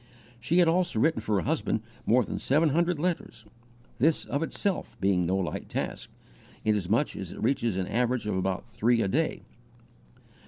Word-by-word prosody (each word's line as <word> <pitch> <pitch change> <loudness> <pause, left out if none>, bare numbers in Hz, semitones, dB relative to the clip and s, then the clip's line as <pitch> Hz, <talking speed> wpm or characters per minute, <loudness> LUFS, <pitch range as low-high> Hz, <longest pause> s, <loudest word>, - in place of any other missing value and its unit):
She 155 +9 0
had 175 -2 +6
also 175 -5 +1
written 150 -2 +2
for 110 -1 0
her 95 - +2
husband 150 -7 0 0.3
more 125 +3 +5
than - - -4
seven 155 +4 +3
hundred 170 +3 +1
letters, 150 -8 -3 0.5
this 155 +5 +2
of 140 - -2
itself 190 +4 -2
being 95 -3 +2
no 95 +2 +1
light 95 -3 -3
task, - - -4 0.6
inasmuch 105 +5 +1
as 95 -3 -6
it - - -7
reaches 115 -5 +1
an 95 - 0
average 120 +2 0
of 105 - -1
about 95 0 -1
three 115 0 +2
a - - 0
day. 155 +11 0
120 Hz, 170 wpm, -28 LUFS, 100-160 Hz, 0.6 s, had